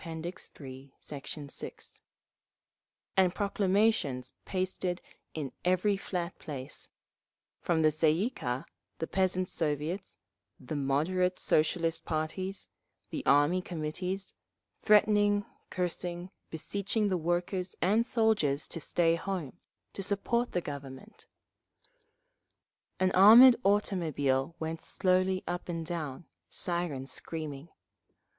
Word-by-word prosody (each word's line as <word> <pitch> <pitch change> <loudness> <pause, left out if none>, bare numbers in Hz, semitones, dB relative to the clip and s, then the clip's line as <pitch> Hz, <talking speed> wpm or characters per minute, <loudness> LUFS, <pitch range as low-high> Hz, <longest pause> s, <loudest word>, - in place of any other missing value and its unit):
III, 150 -5 -8
Sect. 140 -2 -8 0.2
6) - - -9 1.1
and 185 -2 +3
proclamations 195 - +1
pasted 185 -1 -2 0.4
in 145 -4 -3
every 185 +3 +2
flat 180 -2 -4
place; 140 -2 -6 0.7
from 165 -2 +1
the 155 - +5
Tsay 155 +1 +3
ee 190 +10 +1
kah, 125 - -3 0.3
the 160 - -2
Peasants' 185 0 0
Soviets, 155 +4 -2 0.4
the 155 - -6
"moderate" 160 +7 +1
Socialist 165 +2 +1
parties, 175 +5 -3 0.4
the - - -3
Army 145 +6 +4
Committees—threatening, 200 +5 0 0.2
cursing, 180 0 -3 0.2
beseeching 200 +6 -1
the 185 - +1
workers 175 +2 -1
and 210 +6 +3
soldiers 220 - +2
to 165 - -4
stay 165 +1 +2
home, 175 -3 -4 0.3
to - - -5
support 210 +5 0
the 180 - +1
Government…. 140 - -9 1.7
An 185 0 +3
armoured 230 +7 +9
automobile 165 -8 +1
went 160 0 -4
slowly 185 0 +1
up 175 0 -4
and 165 -1 -3
down, 160 -3 -4 0.2
siren 170 -7 0
screaming. 150 +2 -5
175 Hz, 100 wpm, -30 LUFS, 155-190 Hz, 1.7 s, armoured